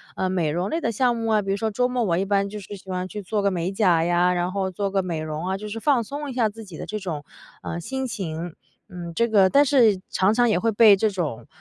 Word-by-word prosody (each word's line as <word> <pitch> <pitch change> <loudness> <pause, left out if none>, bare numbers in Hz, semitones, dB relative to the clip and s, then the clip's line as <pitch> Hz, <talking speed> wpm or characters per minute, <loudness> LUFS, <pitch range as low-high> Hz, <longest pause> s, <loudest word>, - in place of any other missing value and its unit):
呃， 185 - -1
美 175 -5 0
容 175 +5 -1
类 325 - -1
的 230 - -1
项 240 +2 +1
目 225 0 -3
啊， 215 -1 +3
比 195 -1 -3
如 195 - 0
说 220 +1 -1
周 250 +4 +1
末 250 -1 0
我 170 -4 +1
一 190 - +1
般 200 0 +1
就 210 +1 -7
是 205 +1 -9
喜 190 - -16
欢 185 0 -2
去 210 +2 -6
做 205 +3 -2
个 200 0 +1
美 180 +1 -2
甲 180 -5 +3
呀， 175 +1 +2
然 175 +1 -1
后 190 -1 -2
做 200 +2 -2
个 195 -1 0
美 170 -3 -3
容 155 +2 -4
啊， 190 +1 -1
就 210 +2 -7
是 225 +2 -5
放 255 -2 +2
松 285 +4 -6
一 - - -6
下 240 -3 +2
自 225 +2 -9
己 185 -7 -11
的 - - -6
这 215 - -4
种， 165 -6 -5 0.4
呃， 170 - -4
心 265 +9 -4
情。 175 -7 -5 0.3
嗯， 175 -3 -7
这 235 - +2
个 200 -4 +4
但 285 +5 +5
是 230 -8 +4
常 190 +2 +3
常 240 +2 +3
也 210 -6 +2
会 225 +2 +1
被 210 -1 +7
这 215 +2 +1
种， 170 - -4
200 Hz, 305 characters per minute, -24 LUFS, 180-225 Hz, 0.4 s, 被